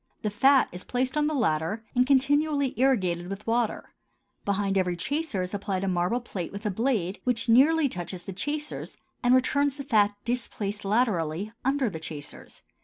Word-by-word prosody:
The 210 Hz, -, 0 dB
fat 265 Hz, +6 st, +5 dB
is 180 Hz, +1 st, -6 dB
placed 255 Hz, +2 st, -1 dB
on 300 Hz, 0 st, +2 dB
the 310 Hz, -, -1 dB
latter 205 Hz, -, 0 dB
and 250 Hz, 0 st, +3 dB
continually 280 Hz, +1 st, +2 dB
irrigated 185 Hz, -10 st, +1 dB
with 195 Hz, +1 st, -6 dB
water; 230 Hz, -1 st, -1 dB, 0.5 s
behind 200 Hz, -1 st, 0 dB
every 180 Hz, -2 st, +1 dB
chaser 280 Hz, -, -1 dB
is 180 Hz, -, -6 dB
applied 195 Hz, -2 st, -2 dB
a -, -, -1 dB
marble 180 Hz, +6 st, 0 dB
plate 185 Hz, -7 st, -5 dB
with 200 Hz, +2 st, -8 dB
a 210 Hz, -, +1 dB
blade 210 Hz, -4 st, -1 dB
which 250 Hz, 0 st, 0 dB
nearly 285 Hz, +6 st, +5 dB
touches 175 Hz, -4 st, -5 dB
the 195 Hz, -, -7 dB
chasers 295 Hz, +9 st, -4 dB, 0.2 s
and 245 Hz, +1 st, +5 dB
returns 280 Hz, +2 st, +2 dB
the 280 Hz, -, -5 dB
fat 210 Hz, -5 st, +3 dB
displaced 215 Hz, -4 st, -3 dB
laterally, 200 Hz, -4 st, 0 dB
under 270 Hz, 0 st, +1 dB
the 175 Hz, -7 st, -4 dB
chasers. 150 Hz, -2 st, -8 dB
220 Hz, 175 wpm, -27 LUFS, 190-265 Hz, 0.5 s, fat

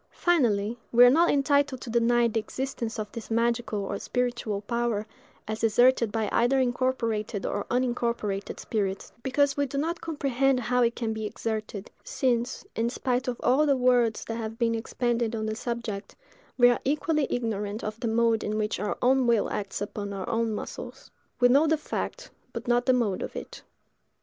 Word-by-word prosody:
Finally, 235 Hz, -, +2 dB
we 245 Hz, +1 st, +8 dB
are 245 Hz, -, +7 dB
not 335 Hz, +5 st, +4 dB
entitled 280 Hz, -1 st, +2 dB
to 240 Hz, -, -7 dB
deny 235 Hz, 0 st, +3 dB
the 225 Hz, 0 st, 0 dB
existence 235 Hz, 0 st, -4 dB
of 210 Hz, -1 st, -4 dB
this 230 Hz, -, -8 dB
magical 230 Hz, -2 st, 0 dB
or 200 Hz, -, -3 dB
spiritual 240 Hz, -5 st, -2 dB
power, 235 Hz, -1 st, -1 dB, 0.4 s
as 215 Hz, +1 st, -4 dB
exerted 235 Hz, 0 st, +4 dB
by 220 Hz, 0 st, -1 dB
either 250 Hz, +3 st, +3 dB
incorporated 240 Hz, -5 st, -1 dB
or 205 Hz, -, -2 dB
unincorporated 235 Hz, -5 st, -1 dB
spirits, 195 Hz, -3 st, -2 dB
because 280 Hz, +2 st, +2 dB
we 285 Hz, -1 st, 0 dB
do 275 Hz, -, -5 dB
not 330 Hz, +4 st, -1 dB
comprehend 275 Hz, -4 st, +1 dB
how 250 Hz, +1 st, +1 dB
it 235 Hz, 0 st, +2 dB
can 225 Hz, -2 st, -2 dB
be 220 Hz, -1 st, -3 dB
exerted; 215 Hz, -2 st, -4 dB
since, 255 Hz, -, -1 dB
in 230 Hz, +1 st, 0 dB
spite 250 Hz, 0 st, -1 dB
of 245 Hz, -1 st, -2 dB
all 290 Hz, +4 st, +4 dB
the 280 Hz, -2 st, +3 dB
words 245 Hz, -3 st, +2 dB
that 225 Hz, -, -4 dB
have 225 Hz, -1 st, -5 dB
been 230 Hz, -1 st, +1 dB
expended 235 Hz, 0 st, -1 dB
on 215 Hz, -1 st, -2 dB
the 215 Hz, 0 st, -2 dB
subject, 235 Hz, -4 st, -5 dB, 0.4 s
we 245 Hz, -1 st, +7 dB
are 245 Hz, -, +3 dB
equally 300 Hz, +1 st, +1 dB
ignorant 215 Hz, -3 st, -2 dB
of 215 Hz, +1 st, -4 dB
the 235 Hz, -, -2 dB
mode 230 Hz, 0 st, +2 dB
in 215 Hz, +1 st, -2 dB
which 210 Hz, -3 st, -1 dB
our 205 Hz, +1 st, -2 dB
own 260 Hz, 0 st, +4 dB
will 230 Hz, -3 st, +2 dB
acts 200 Hz, -1 st, -4 dB
upon 205 Hz, 0 st, -4 dB
our 190 Hz, -2 st, -5 dB
own 230 Hz, -1 st, 0 dB
muscles. 210 Hz, -, -7 dB, 0.3 s
We 245 Hz, -, +6 dB
know 280 Hz, +6 st, +5 dB
the 315 Hz, 0 st, +3 dB
fact, -, -, -5 dB, 0.2 s
but -, -, -6 dB
not 245 Hz, +1 st, +2 dB
the 255 Hz, -, +6 dB
mode 230 Hz, -7 st, 0 dB
of -, -, -5 dB
it. -, -, -7 dB
235 Hz, 185 wpm, -27 LUFS, 220-255 Hz, 0.4 s, we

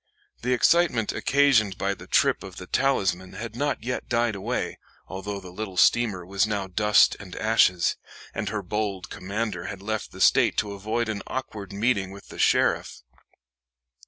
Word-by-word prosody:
The 125 Hz, +2 st, +1 dB
excitement 125 Hz, -4 st, +3 dB
occasioned 130 Hz, -9 st, +3 dB
by -, -, 0 dB
the -, -, -12 dB
trip -, -, +3 dB
of -, -, -9 dB
the -, -, -8 dB
Talisman 95 Hz, -9 st, 0 dB
had 115 Hz, 0 st, -7 dB
not 145 Hz, -2 st, -1 dB
yet 125 Hz, +1 st, -4 dB
died 120 Hz, -1 st, +1 dB
away, 95 Hz, -1 st, -3 dB, 0.3 s
although 100 Hz, +1 st, -5 dB
the 95 Hz, -2 st, -11 dB
little 95 Hz, -1 st, -6 dB
steamer 105 Hz, -4 st, +3 dB
was 100 Hz, +3 st, +1 dB
now 100 Hz, -2 st, -2 dB
dust 105 Hz, +3 st, +4 dB
and 95 Hz, -3 st, -10 dB
ashes, 110 Hz, -5 st, +3 dB, 0.4 s
and 105 Hz, -, -3 dB
her 105 Hz, -1 st, -3 dB
bold 100 Hz, -1 st, -3 dB
commander 100 Hz, -2 st, -3 dB
had 100 Hz, -1 st, -7 dB
left 110 Hz, +1 st, -3 dB
the -, -, -12 dB
State -, -, +4 dB
to 105 Hz, -, -1 dB
avoid 110 Hz, +4 st, -2 dB
an 105 Hz, -2 st, -3 dB
awkward 110 Hz, -7 st, -5 dB
meeting 100 Hz, -1 st, 0 dB
with 100 Hz, +1 st, -12 dB
the -, -, -10 dB
sheriff. -, -, +2 dB
105 Hz, 165 wpm, -25 LUFS, 95-115 Hz, 0.4 s, dust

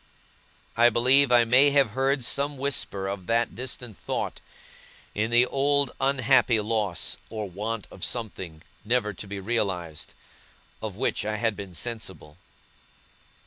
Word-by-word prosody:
I 120 Hz, +1 st, +6 dB
believe 130 Hz, +4 st, +5 dB
I 120 Hz, -1 st, +6 dB
may 130 Hz, +5 st, +6 dB
have 140 Hz, -5 st, +3 dB
heard 135 Hz, +1 st, 0 dB
some 140 Hz, +3 st, -1 dB
whisper 130 Hz, -8 st, -2 dB
of 95 Hz, -2 st, -5 dB
that 115 Hz, 0 st, +1 dB
distant 125 Hz, -3 st, -5 dB
thought, -, -, -4 dB, 0.7 s
in 110 Hz, +2 st, -1 dB
the 120 Hz, +1 st, +5 dB
old 140 Hz, 0 st, +1 dB
unhappy 130 Hz, -3 st, +4 dB
loss 105 Hz, -5 st, -1 dB
or 110 Hz, -2 st, -4 dB
want 105 Hz, +4 st, -4 dB
of 95 Hz, -, -7 dB
something 95 Hz, -9 st, -4 dB, 0.2 s
never 110 Hz, -2 st, 0 dB
to 100 Hz, -, -9 dB
be 100 Hz, 0 st, -5 dB
realized, 95 Hz, -7 st, -3 dB, 0.7 s
of -, -, -5 dB
which -, -, 0 dB
I 110 Hz, +1 st, -2 dB
had 110 Hz, 0 st, 0 dB
been 95 Hz, -3 st, -8 dB
sensible. 95 Hz, -7 st, -5 dB
115 Hz, 140 wpm, -26 LUFS, 100-130 Hz, 0.7 s, I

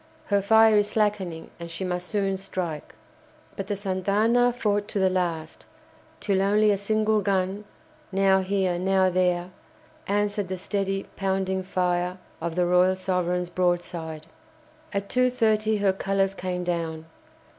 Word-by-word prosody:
Her 200 Hz, -, +4 dB
fire 220 Hz, +1 st, +5 dB
is 205 Hz, 0 st, +2 dB
slackening, 200 Hz, -6 st, -1 dB
and 170 Hz, 0 st, -7 dB
she 170 Hz, +3 st, -5 dB
must 180 Hz, 0 st, -3 dB
soon 195 Hz, -2 st, 0 dB
strike." 180 Hz, -5 st, -5 dB, 0.6 s
But 195 Hz, -, -5 dB
the 205 Hz, -, -1 dB
"Santa 190 Hz, -1 st, -3 dB
Ana" 235 Hz, +4 st, +4 dB
fought 205 Hz, -4 st, -1 dB
to -, -, -4 dB
the 190 Hz, -1 st, +3 dB
last, 170 Hz, -4 st, -3 dB, 0.5 s
till 195 Hz, -2 st, +1 dB
only 210 Hz, +2 st, +3 dB
a -, -, +3 dB
single 215 Hz, +1 st, +1 dB
gun, 195 Hz, +1 st, -1 dB, 0.5 s
now 195 Hz, 0 st, +4 dB
here, 190 Hz, -2 st, 0 dB
now 190 Hz, 0 st, +2 dB
there, 180 Hz, 0 st, +1 dB, 0.6 s
answered 205 Hz, 0 st, 0 dB
the 185 Hz, +1 st, -4 dB
steady, 195 Hz, +1 st, -2 dB
pounding 190 Hz, -1 st, -1 dB
fire 180 Hz, -1 st, -1 dB, 0.2 s
of 165 Hz, 0 st, -3 dB
the 180 Hz, 0 st, +2 dB
"Royal 180 Hz, +1 st, +4 dB
Sovereign's" 180 Hz, -1 st, -1 dB
broadside. 175 Hz, -3 st, -2 dB, 0.7 s
At 200 Hz, -1 st, -2 dB
2.30 220 Hz, -4 st, +2 dB
her 195 Hz, -2 st, +3 dB
colours 195 Hz, 0 st, 0 dB
came 180 Hz, -1 st, -3 dB
down. 165 Hz, -2 st, -3 dB
190 Hz, 145 wpm, -25 LUFS, 180-205 Hz, 0.7 s, fire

